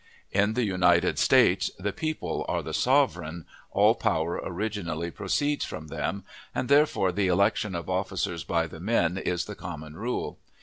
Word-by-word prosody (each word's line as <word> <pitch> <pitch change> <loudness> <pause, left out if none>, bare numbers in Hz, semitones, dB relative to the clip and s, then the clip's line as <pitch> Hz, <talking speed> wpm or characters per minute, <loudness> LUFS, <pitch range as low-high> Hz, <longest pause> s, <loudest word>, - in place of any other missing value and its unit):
In 105 +2 +2
the 125 - +1
United 90 -4 +3
States - - +4
the 100 +1 -3
people 155 +6 -3
are - - -1
the - - -6
"sovereign," 90 - +1 0.3
all - - +5
power 80 +2 -1
originally 85 -4 -3
proceeds 145 - 0
from 80 0 -6
them, 95 +5 -3 0.3
and 130 - -2
therefore 140 -10 +4
the 95 +1 0
election 100 +1 +2
of 85 -2 -4
officers 95 -2 -2
by 85 -1 0
the 80 0 -10
men 95 -2 +1
is 90 -2 -1
the 105 - -6
common 80 -5 -8
rule. 120 +7 -3
95 Hz, 160 wpm, -27 LUFS, 85-105 Hz, 0.3 s, all